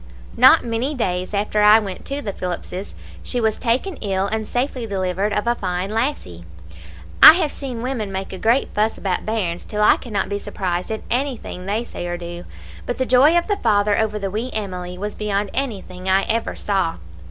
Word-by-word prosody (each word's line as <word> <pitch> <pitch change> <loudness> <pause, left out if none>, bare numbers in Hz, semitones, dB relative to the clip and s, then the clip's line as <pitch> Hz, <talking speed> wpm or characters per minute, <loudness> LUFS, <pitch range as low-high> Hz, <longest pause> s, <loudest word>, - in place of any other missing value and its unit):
"Not - - +6
many 240 +6 -1
days 180 -6 -2
after 210 +1 0
I 210 +1 +8
went 200 -4 -4
to 280 +1 -4
the 200 -3 -3
Phillips's, 180 +1 -5 0.3
she 245 - -2
was 220 -2 0
taken 260 +9 -1
ill 195 -2 -1
and 215 +1 -2
safely 250 -1 -2
delivered 190 0 -1
of 210 +1 -1
a 235 - +3
fine 185 -2 -3
lassie. 220 - -2 0.8
I 310 - +13
have 325 -4 0
seen 250 -4 -6
women 240 -6 -3
make 190 0 -5
a 190 - -7
great 235 +5 +2
fuss 215 +1 +1
about 190 0 -2
bairns, 190 -6 -2
till 210 0 -2
I - - +6
cannot 205 -6 -3
be 200 0 -3
surprised 180 -3 -3
at 220 0 -4
anything 245 -8 -2
they 215 +4 0
say 175 -6 -6
or 175 0 -3
do, 175 0 -8 0.4
but 245 - -2
the 260 - 0
joy 270 +7 +5
of 345 - +1
the 410 -1 -1
father 205 - +2
over 215 -1 0
the 195 -2 -3
wee 225 +5 -3
Emily 180 -4 -4
was 205 +2 -4
beyond 205 -1 -2
anything 190 -8 -4
I 190 +1 +4
ever 230 0 -1
saw. 195 -5 -1
210 Hz, 200 wpm, -21 LUFS, 190-240 Hz, 0.8 s, I